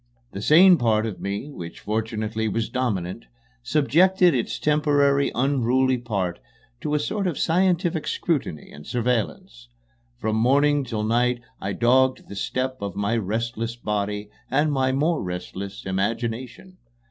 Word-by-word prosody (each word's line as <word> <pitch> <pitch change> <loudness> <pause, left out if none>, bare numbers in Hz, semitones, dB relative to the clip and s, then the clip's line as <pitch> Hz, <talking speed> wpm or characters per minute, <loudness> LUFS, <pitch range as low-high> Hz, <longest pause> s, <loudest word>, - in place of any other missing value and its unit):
The 100 - -6
sane 175 - +7
part 110 -2 +2
of 110 -4 -5
me, 100 +9 -4
which 85 -10 -9
fortunately 110 0 -2
was 110 +2 -1
dominant, 110 -6 -2 0.3
subjected 165 +8 +3
its 120 -2 -1
temporarily 145 +1 +2
unruly 130 0 +2
part 100 -7 -2 0.4
to 150 - -1
a - - +2
sort 195 +6 -2
of 165 -7 -2
scientific 175 -1 +1
scrutiny 135 - -2
and 75 - -12
surveillance. 120 - -2 0.5
From 110 -2 -1
morning 140 +5 +3
till 110 -4 -3
night 120 +2 +1 0.2
I 100 +1 -2
dogged 130 +3 +2
the 100 - -7
steps 130 +5 -2
of 100 -3 -4
my 100 +3 0
restless 115 +2 -2
body 105 -2 -3 0.2
and 145 +3 +2
my 130 -2 +1
more 150 +5 +1
restless 95 +2 -6
imagination. 115 - -3
120 Hz, 135 wpm, -24 LUFS, 105-145 Hz, 0.5 s, sane